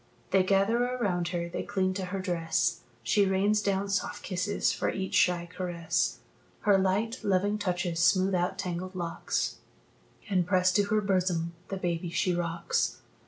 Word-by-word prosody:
They 190 - +5
gather 195 +5 +2
around 205 -9 -1
her, 175 -1 -2
they 170 - -4
cling 190 -2 0
to 190 0 -3
her 195 +2 -4
dress; 170 -2 0 0.2
She 195 - +3
rains 200 +3 +2
down 200 -1 0
soft 195 -1 -2
kisses 190 +3 0
for - - -1
each 190 -1 -3
shy 175 -1 +3
caress. 170 -2 -1 0.4
Her 205 -2 +4
light, 195 +6 +1
loving 205 +1 +1
touches 175 -3 -1
smooth 185 +2 +3
out 180 +1 0
tangled 185 -1 -4
locks, 170 -2 -2 0.7
And, 185 -4 +1
pressed 185 -1 +3
to 205 - +3
her 215 +1 +1
bosom, 180 -4 0
the 195 - -4
baby 175 -2 -2
she 180 +2 +1
rocks. 170 -1 -1
185 Hz, 160 wpm, -29 LUFS, 175-200 Hz, 0.7 s, They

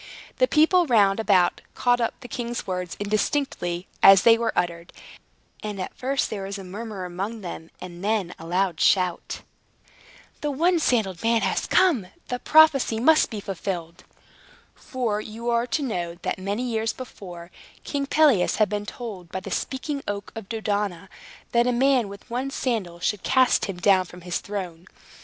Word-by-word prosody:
The - - +4
people 335 +1 +4
round 205 -5 +4
about 190 -5 +3
caught 245 -1 +2
up 230 - -2
the 245 - -9
king's 240 0 -4
words, 180 -2 -4
indistinctly 205 -4 -1 0.2
as 195 -1 +8
they 230 -1 +7
were 230 0 -1
uttered; 170 -1 -2 0.7
and 205 -3 -4
first 270 +1 -1
there 205 - -4
was 200 +1 -5
a 195 - -8
murmur 200 0 -6
amongst 195 +5 -5
them, 170 -2 -7
and 180 0 -9
then 205 -4 0
a 165 - -9
loud 180 -1 0
shout. 180 -3 +1 1.0
"The 295 - -1
one 335 +5 +2
sandaled 215 - +1
man 230 0 +2
has - - 0
come! 335 - +3 0.2
The 250 - -2
prophecy 295 -8 +5
must 310 +6 +4
be 215 - -5
fulfilled!" 180 -3 -5 0.7
For 230 -5 -3
you 230 +3 -4
are 235 +1 +1
to 290 +4 -1
know, 175 -9 -3
that, - - -2
many 200 +5 -2
years 225 -2 -1
before, 180 -8 -10 0.3
King 280 -1 -2
Pelias 280 -12 +4
had 215 -3 +2
been 205 0 -3
told 195 -9 -8
by 190 - -3
the 195 0 -8
Speaking 275 +7 -3
Oak 200 0 -4
of 225 -3 -8
Dodona, 205 -5 -2 0.4
that 235 +1 +3
a - - +3
man 250 -3 +2
with 200 0 -11
one 250 +3 -3
sandal 215 -11 -2
should 200 +2 -1
cast 260 -1 +3
him 195 -3 -5
down 190 0 +4
from 180 +1 -13
his 175 0 -3
throne. 185 -4 -6
210 Hz, 170 wpm, -24 LUFS, 185-245 Hz, 1.0 s, as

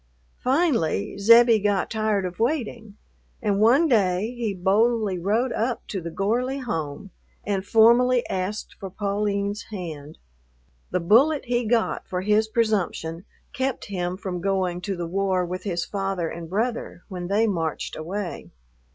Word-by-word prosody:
Finally 255 - +1
Zebbie 230 +2 +7
got 205 -2 0
tired 215 -3 0
of 180 +2 -6
waiting, 230 -5 -2 0.4
and 205 -2 0
one 260 +9 +5
day 210 -3 +2
he 235 -3 -2
boldly 200 +1 +1
rode 220 +8 +1
up 235 +2 -2
to 195 - -3
the 170 - -5
Gorley 240 +9 -1
home 165 - -4 0.3
and 195 -2 -1
formally 235 +3 +4
asked 190 +3 -3
for 195 - -6
Pauline's 200 +1 -2
hand. 160 -7 -7 0.7
The 180 - 0
bullet 265 - +4
he 240 -1 0
got 225 0 0
for 180 -1 -2
his 210 +2 +2
presumption 200 -7 -1 0.3
kept 265 0 -2
him 180 0 -2
from 185 -3 -5
going 185 -2 0
to 195 +2 -3
the 175 -1 -4
war 185 +1 0
with 180 +1 -5
his 175 -4 -1
father 195 -4 -2
and 165 -1 -7
brother 220 -2 -2
when 180 -3 -6
they 205 +4 +2
marched 165 -7 -2
away. 175 - -5
200 Hz, 145 wpm, -24 LUFS, 180-230 Hz, 0.7 s, Zebbie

